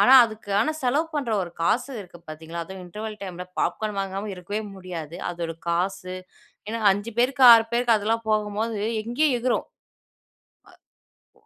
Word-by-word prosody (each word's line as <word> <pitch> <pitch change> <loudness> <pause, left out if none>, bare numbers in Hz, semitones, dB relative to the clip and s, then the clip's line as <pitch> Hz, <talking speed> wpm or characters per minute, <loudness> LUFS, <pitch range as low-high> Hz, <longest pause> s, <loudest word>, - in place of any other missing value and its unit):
ஆனா 260 - +7
அதுக்கானா 215 +4 -1
செலவு 280 +6 +2
பண்ற 275 -6 -1
ஒரு 175 - -6
காசு 245 +9 +1
இருக்கு 175 -3 -12
பாத்தீங்களா? 165 +2 -6
அதுவும் 190 +1 -9
இன்டர்வல் 215 +4 -6
டைம்ல 180 -2 -6 0.2
பாப்கார்ன் 210 -2 -1
வாங்காம 195 +2 -4
இருக்கவே 200 +4 -4 0.2
முடியாது. 170 -4 -7
அதோட 170 -1 -4 0.2
காசு. 185 +2 -1 0.5
ஏன்னா, 230 +1 -2
5 205 +4 -4
பேருக்கு, 260 +2 +2
6 225 -1 +7
பேருக்கு 235 -1 +3
அதெல்லாம் 225 +2 -1
போகும்போது 215 +1 0 0.2
எங்கேயோ 250 +7 +1
எகுரும். 245 +1 0 1.7
அ - - -34
210 Hz, 140 wpm, -25 LUFS, 185-230 Hz, 1.7 s, ஆனா